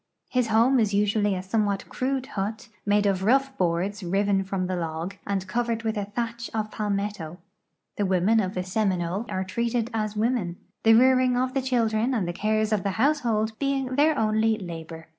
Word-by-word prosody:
His 250 -3 +1
home 230 +4 +4
is 210 -3 +1
usually 205 0 +2
a 185 - -4
somewhat 200 0 -1
crude 265 0 -2
hut, 215 +2 -4 0.2
made 205 0 +3
of 195 -2 +1
rough 270 +5 +2
boards 185 +2 -1
riven 195 +2 +1
from 190 -1 -2
the 185 0 -2
log, 165 +2 -4
and 195 -2 -1
covered 235 +2 -1
with 220 0 -1
a 205 -1 -2
thatch 235 +3 -4
of 215 -1 -2
pal 210 -1 -3
metto. 200 -5 -3 0.6
The 205 - +1
women 190 +4 +3
of 190 -2 -1
the 180 - -1
Seminole 185 +1 -1
are 190 - -1
treated 235 +4 -1
as 215 -1 -2
women, 215 -6 0 0.2
the 225 0 +6
rearing 255 +1 +4
of 255 +1 0
the 270 - +1
children 240 -1 +1
and 200 -7 0
the 175 - -2
cares 215 +3 0
of 210 - +1
the 195 +1 -2
household 230 -5 +1
being 275 -2 -1
their 300 +2 +3
only 220 0 +2
labor. 165 -4 -8
215 Hz, 190 wpm, -26 LUFS, 190-235 Hz, 0.6 s, the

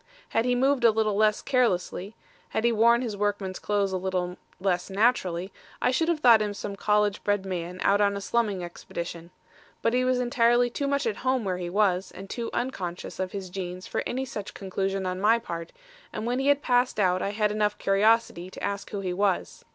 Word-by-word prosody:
Had 225 - +1
he 250 0 +2
moved 265 0 +2
a 230 - +8
little 215 -1 +1
less 215 0 +2
carelessly, 215 -5 0 0.3
had 220 - -1
he 235 - +4
worn 235 +2 +4
his 225 -4 -3
workman's 200 -2 -2
clothes 205 -2 0
a 190 - 0
little 180 -1 -2 0.2
less 180 -1 0
naturally, 190 -4 +1 0.3
I - - +2
should 325 +6 +1
have 335 -3 0
thought 230 -5 +7
him 205 -1 -2
some 200 0 -5
college 210 0 +1
bred 205 -1 0
man 180 -1 -4
out 200 +1 +4
on 200 -1 +2
a - - -5
slumming 205 -4 0
expedition. 170 -1 -7 0.5
But 230 - +2
he 250 0 +2
was 255 0 +2
entirely 240 0 +3
too 280 +3 -2
much 280 0 0
at 220 -3 -1
home 260 -1 0
where 185 -2 -1
he 175 -1 -4
was, 190 -1 +1
and 195 +1 -10
too 235 -1 -3
unconscious 185 -11 -4
of 185 -1 -2
his 190 -3 -6
jeans 180 -1 -5
for - - -2
any 260 +2 -2
such 210 -5 -7
conclusion 195 0 -2
on 185 0 -3
my 220 +3 +5
part, 170 -7 -6 0.4
and 215 - -4
when 245 +2 0
he 270 - 0
had 285 0 +3
passed 245 -2 +2
out 185 -2 +2
I - - -1
had 210 0 0
enough 210 -1 0
curiosity 195 -2 +2
to - - -10
ask 200 0 -3
who 200 - -4
he 185 -2 -2
was. 195 0 -1
205 Hz, 215 wpm, -27 LUFS, 185-235 Hz, 0.5 s, a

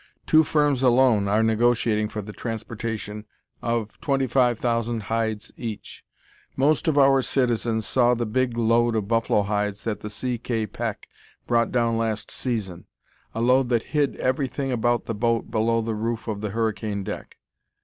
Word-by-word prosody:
Two 160 0 +5
firms 145 -3 +1
alone 125 -5 +4
are 105 +3 +2
negotiating 110 -1 +2
for 105 -1 -5
the 105 +1 -9
transportation 110 -2 -5 0.3
of 115 -2 -2
twenty 135 -2 +1
five 125 -1 +2
thousand 115 -1 -1
hides 110 -2 -2
each. 115 -4 -7 0.5
Most 150 +5 +2
of 155 -2 +2
our 135 -1 +5
citizens 120 -4 0
saw 125 -1 +3
the 120 0 -2
big 120 +2 0
load 115 0 +3
of 105 -3 -1
buffalo 115 -2 +2
hides 105 0 -2
that 105 -3 -2
the 105 - -6
C. 120 +3 -3
K. 115 -2 -2
Peck 105 - -5 0.4
brought 115 -1 +1
down 115 -2 +1
last 110 -2 -2
season, 100 -9 -4 0.5
a 115 - -1
load 125 +1 +3
that 120 -2 +1
hid 145 -2 +1
everything 135 +1 -1
about 120 0 +1
the 115 - -3
boat 115 +1 0
below 115 +1 +1
the 115 0 -2
roof 115 +2 -3
of 105 -2 -3
the 105 - -2
hurricane 110 -1 -2
deck. - - -7
115 Hz, 165 wpm, -24 LUFS, 110-125 Hz, 0.5 s, Two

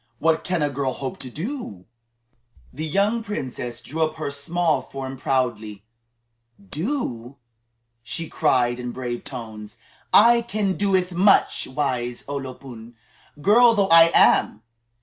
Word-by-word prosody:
What 160 +4 +1
can 180 -4 -1
a 145 - +1
girl 135 -1 -2
hope 135 0 -6
to 130 - -8
do?" 155 - -6 0.9
The 155 +4 -4
young 200 +8 +1
princess 125 - -5
drew 160 +4 -5
up 155 0 0
her 155 -2 -4
small 160 +3 0
form 135 -1 -7
proudly. 115 -6 -2 0.8
"Do?" 135 - -4 0.6
she 165 +7 -4
cried 125 -6 +1
in 125 -1 -5
brave 120 -2 -5
tones; 110 -5 -9 0.3
"I 235 +2 +6
can 215 -4 -1
do 195 -1 +2
much, 195 +3 +3
wise 130 -3 -3
O 145 - -4
lo 130 -2 -6
pun, 120 -3 -12 0.5
girl 230 +5 +6
though 200 -2 +1
I 165 0 +8
am! 110 - +4
140 Hz, 135 wpm, -23 LUFS, 125-180 Hz, 0.9 s, I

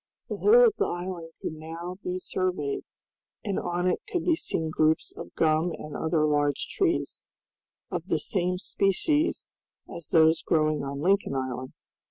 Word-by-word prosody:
The - - -3
whole 475 +4 +7
of 450 - +4
the - - +2
island 175 -2 -5
could - - -2
now 165 +4 -7
be 180 0 -2
surveyed, 180 -6 -2 0.6
and 200 -3 -1
on 175 0 -2
it 180 - +1
could 360 - -1
be 335 - +4
seen 160 - -2
groups 155 0 +2
of - - -9
gum 160 +2 +2
and 150 -1 -8
other 160 -1 +1
large 145 -2 +1
trees, 360 -4 0 0.7
of - - -3
the - - +1
same 180 -3 0
species 245 - +1 0.4
as 170 -4 -8
those 160 -1 +5
growing 155 -2 +1
on 140 0 -4
Lincoln 190 -4 +2
Island. 130 -1 -3
170 Hz, 160 wpm, -27 LUFS, 155-185 Hz, 0.7 s, whole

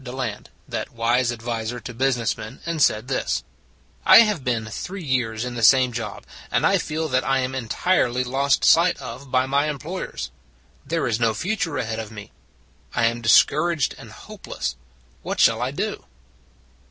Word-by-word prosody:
Deland, 125 -4 -5 0.2
that - - -4
wise 120 +1 +1
adviser 115 0 -4
to 125 - -8
busi 130 +2 +1
ness 115 -2 -1
men, 110 +4 -9
and 165 -2 -2
said 110 -2 +3
this: 130 - -1 0.6
"I - - +9
have 210 - +1
been 120 -3 -1
three 180 - -6
years 125 -5 -1
in 125 - -5
the 120 - -4
same 130 +2 +5
job, 115 -3 -5 0.2
and - - +1
I - - +4
feel 160 +1 -2
that 130 0 +1
I 135 0 +1
am 130 +1 -3
entirely 125 +1 0
lost 135 +2 +1
sight 170 +2 +5
of 135 +1 -8
by 130 0 +2
my 140 +3 +1
employers. 150 - -5 0.5
There 165 0 -1
is 115 -2 0
no 115 -2 +2
future 175 - -2
ahead 110 -1 -3
of 110 -2 -6
me; 105 -2 -10 0.6
I 115 - +3
am 115 +1 0
dis 115 -1 +7
couraged 155 -1 -1
and - - -11
hopeless. 65 -1 -6 0.5
What - - -4
shall - - +4
I - - 0
do?" - - -3
125 Hz, 175 wpm, -23 LUFS, 115-140 Hz, 0.6 s, I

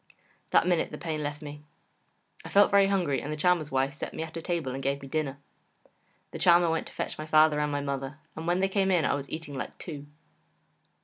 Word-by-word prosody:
That - - +4
minute 175 -2 +1
the - - -7
pain 160 -3 -3
left 145 0 -4
me. 145 0 -8 0.8
I - - -8
felt 205 0 +5
very 200 -1 +6
hungry, 180 -8 +1
and 150 - -5
the 155 - -3
Charmer's 165 -2 +2
wife 135 +1 +1
set 150 - -6
me - - -3
at 160 0 -9
a 165 - -4
table 160 -6 -2
and 135 - -4
gave 140 +1 -1
me - - -7
dinner. 140 -1 -2 0.9
The - - -7
Charmer 170 -1 +5
went 165 - -1
to - - -11
fetch - - -4
my 155 - -5
father 155 -1 +5
and 150 0 0
my 145 0 -1
mother, 140 0 -4 0.2
and 160 +1 -6
when 175 +2 +2
they 195 - +3
came 195 0 +1
in 175 -5 +3
I - - +2
was 140 -1 -4
eating 160 -2 -6
like 135 - -6
two. 145 -4 -8
155 Hz, 235 wpm, -28 LUFS, 145-175 Hz, 0.9 s, very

